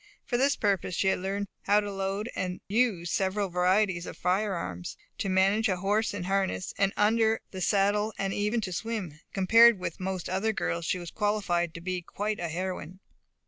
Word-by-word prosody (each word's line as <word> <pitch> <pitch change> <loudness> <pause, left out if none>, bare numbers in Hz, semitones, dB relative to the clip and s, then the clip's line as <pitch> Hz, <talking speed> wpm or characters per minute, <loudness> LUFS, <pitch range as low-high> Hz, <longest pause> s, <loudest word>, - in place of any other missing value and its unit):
For 245 - -2
this 275 +3 +3
purpose 195 -4 0
she 190 - +2
had - - +1
learned 200 +2 -2 0.2
how 205 +1 +5
to 205 -1 -3
load 195 +2 -2
and 180 0 -3
use 205 -6 +1
the - - -2
several 195 +1 0
varieties 180 0 +2
of - - -8
firearms 180 - -2 0.2
to 195 - -1
manage 195 +4 +3
a 185 - +1
horse 205 +4 +1
in 205 -3 -4
harness 190 0 -1
and 195 -1 +2
under 220 +1 +3
the 190 - -6
saddle 205 +3 +2
and 195 0 -1
even 210 +3 0
to 185 -3 -4
swim. 195 -7 -4
Compared 225 +4 +6
with 180 -3 -5
most 185 -1 -3
other 200 +4 0
girls 170 -5 -2
she - - +1
was 175 -2 -7
qualified 190 -6 0
to 170 - -7
be 180 0 -3
quite 210 +4 -3
a 170 - -2
heroine. 180 +1 -4
195 Hz, 190 wpm, -28 LUFS, 180-210 Hz, 0.2 s, Compared